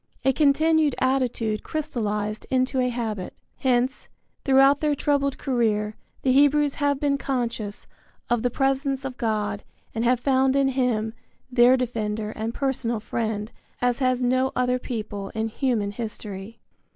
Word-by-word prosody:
A 265 - +4
continued 305 +1 +3
attitude 245 -5 0
crystallized 215 -9 -3
into 260 0 +1
a 250 0 +2
habit. 220 -6 -4 0.2
Hence, 255 +1 0 0.3
throughout 270 +1 +5
their 300 -1 +2
troubled 280 -1 0
career 215 -5 0 0.3
the 260 - +3
Hebrews 290 +1 +4
have 285 -1 +2
been 280 -1 +1
conscious 235 -6 -3 0.4
of 240 -2 +1
the 245 - +1
presence 270 +1 0
of 260 -2 -4
God 210 -3 -1 0.3
and 225 - -1
have 245 0 +3
found 265 +1 +2
in 275 -1 +3
him 240 -4 0 0.4
their 245 +1 +6
defender 220 -3 -2
and 220 +1 -3
personal 240 -3 -1
friend 215 -1 -3 0.3
as 245 0 +1
has 255 -1 +1
no 255 +1 +2
other 250 0 +1
people 210 -5 -5
in 220 0 -1
human 225 -4 0
history. 210 -1 -6
250 Hz, 140 wpm, -25 LUFS, 220-270 Hz, 0.4 s, their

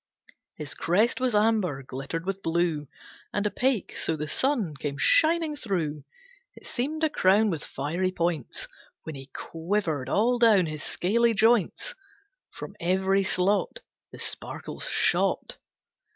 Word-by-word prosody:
His 150 -2 -5
crest 210 +10 +1
was 250 -4 +1
amber 210 -10 +2
glittered 135 +6 -5
with 195 0 -3
blue, 165 -3 0 0.4
And 205 - -1
opaque 245 0 0
so 160 - -1
the 150 0 -4
sun 230 - 0
came 140 0 -4
shining 320 - +4
through. 165 - -3 0.5
It - - -15
seemed 300 +6 -3
a 315 - +4
crown 205 0 +4
with 160 -3 -4
fiery 170 +7 -2
points. 170 -6 -2 0.4
When 160 - -6
he 135 -1 -9
quivered 165 -3 -2
all 240 +4 +2
down 215 -6 +5
his 155 -2 -5
scaly 230 +8 +1
joints, 225 - +2 0.6
From - - -9
every 190 +3 +2
slot 200 - 0 0.3
The - - -11
sparkles - - -4
shot. - - +1
190 Hz, 135 wpm, -27 LUFS, 160-225 Hz, 0.6 s, down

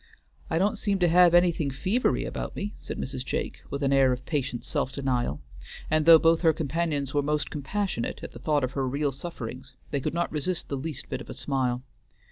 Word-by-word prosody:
"I - - +1
don't 205 +4 +1
seem 200 -2 +1
to 180 -2 +3
have 175 0 +6
anything 170 -4 +3
fevery 190 - 0
about - - -5
me," 205 +1 -4
said - - -6
Mrs. 130 -1 -4
Jake, - - -3
with 140 +1 -3
an 140 0 +2
air 135 -1 +5
of 125 0 -3
patient 135 -6 -2
self 130 - -1
denial; 125 - -1 0.5
and 155 0 +2
though 165 -1 +11
both 165 +1 +3
her 165 -2 +5
companions 150 -2 -1
were 145 - +3
most 150 +1 -1
compassionate 160 - -3
at - - -6
the - - -11
thought 150 -3 +1
of 130 - -1
her 135 -2 -1
real 140 +2 0
sufferings, 130 -3 -7 0.2
they 140 - 0
could 155 - -2
not 175 0 0
resist 160 +4 -2
the 140 - -1
least 140 0 -5
bit - - -4
of - - -11
a - - -6
smile. 130 -3 -1
145 Hz, 215 wpm, -27 LUFS, 130-170 Hz, 0.5 s, though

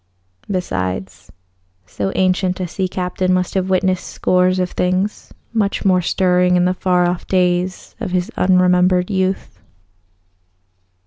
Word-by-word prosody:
Besides, 95 - -4 0.5
so 95 +1 -3
ancient 185 0 +1
a 180 - -2
sea 185 +2 -2
captain 185 0 -2
must 185 -1 0
have 190 -1 -1
witnessed 185 0 0
scores 185 0 +1
of 180 -1 -1
things 185 +3 -1 0.2
much 205 -3 -1
more 185 -2 +4
stirring 180 +1 +2
in 180 0 +3
the 180 - +2
far 180 -1 +1
off 175 0 -3
days 180 0 0
of 220 -5 -4
his 180 0 -1
unremembered 180 0 +3
youth. 190 0 -2
180 Hz, 130 wpm, -18 LUFS, 180-185 Hz, 0.5 s, more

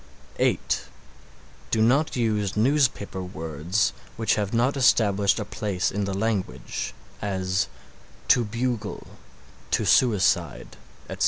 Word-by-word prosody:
(8) - - +1 0.8
Do 115 - +1
not 135 +8 +3
use 105 -5 0
newspaper 120 -6 +1
words 80 - -1 0.2
which 115 0 +2
have 105 -2 -1
not 120 +4 +2
established 105 -6 +3
a 105 - -3
place 100 -3 -2
in 100 0 -1
the 100 - -3
language 100 - -3 0.3
as 95 -2 -1 0.6
"to 120 - +5
bugle"; 115 -1 -3 0.6
"to - - +1
suicide," 110 -7 +2 0.3
etc. - - -7
105 Hz, 110 wpm, -25 LUFS, 95-115 Hz, 0.8 s, to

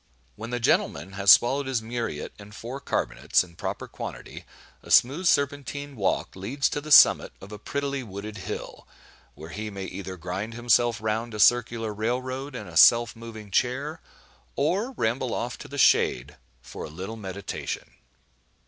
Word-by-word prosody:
When 110 +2 -7
the 120 0 -2
gentleman 90 -6 +1
has 100 0 0
swallowed 135 +6 +6
his 130 -3 0
muriate 115 -9 -4
and 105 +1 -12
four 120 +5 -7
carbonates 140 - 0
in 85 -2 -16
proper - - -5
quantity, - - -8 0.4
a - - -15
smooth 150 +9 +4
serpentine 145 -1 0
walk 100 -5 -1
leads 125 +9 -1
to 145 - -3
the 155 +1 -8
summit - - +7
of 100 - -12
a 105 - -8
prettily 140 +4 -3
wooded 105 -1 -8
hill, 95 - -7 0.5
where 80 +2 -10
he 105 +1 -5
may 100 -2 -6
either 95 0 -7
grind 95 +6 -5
himself 120 -1 +2
round 110 +1 -2
a - - -6
circular 115 -1 +3
rail 115 +4 -1
road 130 +1 -6
in 105 -6 -6
a 85 -1 -5
self 115 +6 +6
moving 110 -3 -10
chair, 135 +9 -1 0.5
or 190 - 0
ramble 120 - -1
off 120 +1 -4
to - - -9
the 145 - -8
shade, 70 - +3 0.3
for - - -8
a - - -7
little 95 +8 -7
meditation. 100 -2 -6
115 Hz, 165 wpm, -26 LUFS, 100-130 Hz, 0.5 s, summit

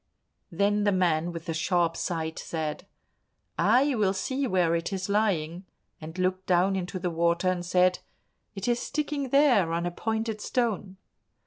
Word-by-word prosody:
Then 205 +1 +1
the 205 - +3
man 175 -3 +1
with 165 -1 -7
the 165 - -3
sharp 170 0 +1
sight 160 -2 -3
said, 155 -2 -4 0.7
"I 275 +3 +4
will 205 -5 +2
see 260 +8 -2
where 180 -5 +2
it 170 +2 -1
is 190 0 -3
lying," 185 -4 0 0.3
and 160 +3 -8
looked 185 0 -1
down 185 +2 +3
into 185 0 -3
the 180 -1 -2
water 170 +2 +1
and 180 -1 -1
said, 180 +1 +2 0.6
"It 195 +2 -4
is 240 0 +2
sticking 295 -2 -3
there, 250 - +4
on 170 +1 -1
a 175 - -1
pointed 220 +2 -3
stone." 210 -7 -1
185 Hz, 160 wpm, -27 LUFS, 170-210 Hz, 0.7 s, I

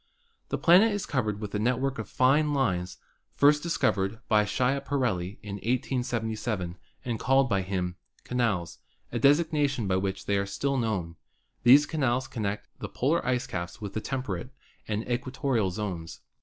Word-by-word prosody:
The - - -1
planet 185 +7 +6
is 205 - -2
covered 110 -7 -1
with 105 -2 -6
a 105 - 0
network 130 +3 0
of 110 - -5
fine 145 +3 +3
lines, 90 -9 0 0.4
first 150 +1 +5
discovered 110 - 0
by 105 -1 +4
Schiaparelli 125 -5 0
in 100 -1 -5
1877 115 -5 -2 0.3
and 115 -3 -2
called 135 0 +3
by 100 -5 +1
him 90 -1 -3 0.3
"canals," 100 -9 -1 0.3
a 120 - -2
designation 145 -3 +3
by 95 -1 +1
which 95 0 -3
they 100 -1 +1
are 100 - -2
still 140 +7 -1
known. 95 -9 -2 0.4
These 135 +5 +7
canals 130 -5 0
connect 105 -2 -3
the - - -5
polar 150 +7 +1 0.2
caps 85 -2 -5
with 100 -3 -6
the 110 - -2
temperate 125 -7 -4 0.4
and 105 +1 -2
equatorial 125 -3 0
zones. 90 -4 -5
115 Hz, 150 wpm, -28 LUFS, 100-135 Hz, 0.4 s, These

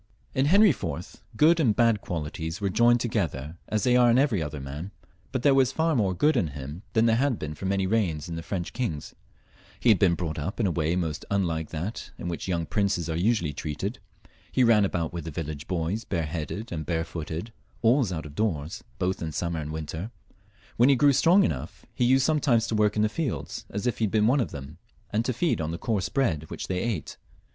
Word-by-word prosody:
In 135 0 +2
Henry 200 +4 +6
IV. 130 - -5 0.2
good 165 +5 +5
and 120 -10 +3
bad 115 -3 +3
qualities 80 +1 -4
were 100 -2 -1
joined 120 +4 +4
together 85 - -2
as 110 -1 -1
they 125 -1 +4
are 125 -1 +6
in 120 - +5
eveiy 125 - +2
other 75 -1 -5
man, 70 +7 -6 0.4
but 130 -2 -2
there 140 - +6
was 135 -2 +4
far 160 +2 +1
more 100 -6 +1
good 150 - +3
in 85 - +2
him 70 +5 -7
than 115 0 +4
there 115 -1 +4
had 135 -2 +1
been 75 0 -5
for 95 +5 -5
many 95 0 +1
reigns 95 -8 0
in 85 - -5
the 80 - -4
French 85 0 -4
kings. 85 - -3 0.7
He 125 - +3
had 105 - +6
been 90 -4 +4
brought 80 -3 -3
up 95 +10 -4
in 115 - +2
a 95 - +2
way 80 0 0
most 80 -4 -2
unlike 85 -5 0
that 85 +8 -5
in - - -6
which 85 - -4
young 85 -3 0
princes 95 -5 0
are - - -2
usually 90 -4 +1
treated. 75 0 -4 0.5
He 130 - +3
ran 110 -4 +5
about 85 -4 -2
with 85 -2 -5
the 80 - -5
viUage 75 -2 -5
boys 90 +5 -1
bareheaded 85 +5 -3
and 80 -3 -3
barefooted, 80 +4 -4 0.3
always 120 -2 +4
out 80 -4 -4
of 75 - -9
doors,, 90 -1 -2
both 95 0 -1
in 80 -2 -3
summer 85 +1 -2
and 75 0 -5
winter; 80 +5 -5 0.7
when 120 +4 +6
he 140 - +6
grew 140 +2 +5
strong 175 +8 +5
enough 65 -5 -3
he 125 - +1
used 130 +2 +4
sometimes 140 -7 +3
to 115 - -3
work 105 -1 +2
in 105 - +2
the - - +4
fields 105 - -4
as 100 +3 -4
if 125 - 0
he 110 - +3
had 100 - -2
been 110 -1 +3
one 130 +6 +4
of 120 - 0
them, 70 +1 -9 0.3
and 110 +2 +1
to 130 - +1
feed 155 - 0
on 80 - -2
the 85 - -3
coarse 105 -2 -1
bread 80 - 0
which - - -5
they 90 -1 -1
ate. 110 -10 -3
95 Hz, 225 wpm, -27 LUFS, 80-120 Hz, 0.7 s, Henry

